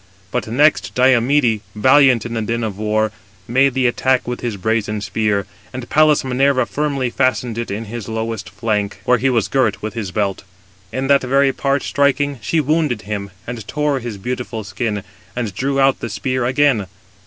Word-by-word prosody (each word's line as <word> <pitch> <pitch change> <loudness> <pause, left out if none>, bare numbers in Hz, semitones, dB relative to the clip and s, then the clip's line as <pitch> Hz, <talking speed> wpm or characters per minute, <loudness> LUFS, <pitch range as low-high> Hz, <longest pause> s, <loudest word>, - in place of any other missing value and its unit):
But - - -2
next 145 +7 +2
Diomede, 125 -2 +3
valiant 130 0 +5
in 120 - -5
the 115 - -1
din 115 +2 -2
of 105 -3 -4
war, 110 0 +1 0.4
made 130 +2 +3
the 130 -1 +1
attack 130 +1 +1
with 125 0 -4
his 115 -4 -3
brazen 105 +1 -1
spear; 105 -1 -1 0.3
and 125 -1 -6
Pallas 155 0 +4
Minerva 130 0 +2
firmly 135 +2 -1
fastened 130 -3 0
it 115 - -4
in 105 +3 -4
his 115 0 -7
lowest 110 -2 -4
flank, 105 -3 -2
where 125 -1 +3
he 135 - +2
was 115 -5 +1
girt 110 -6 0
with 110 -1 -3
his 110 -4 -4
belt. 100 0 -2 0.5
In 130 +1 -2
that 140 0 +4
very 135 +1 +2
part 140 0 0
striking, 140 -1 +1
she 160 +11 0
wounded 150 -6 0
him, 100 -1 -4 0.2
and 115 -3 -7
tore 150 -2 0
his 115 -4 -6
beautiful 120 +1 -4
skin, 105 +1 -3 0.3
and 115 -5 -3
drew 135 +7 -1
out 135 0 +3
the 115 - -4
spear 130 +3 -2
again. 130 -5 +2
120 Hz, 180 wpm, -19 LUFS, 110-135 Hz, 0.5 s, valiant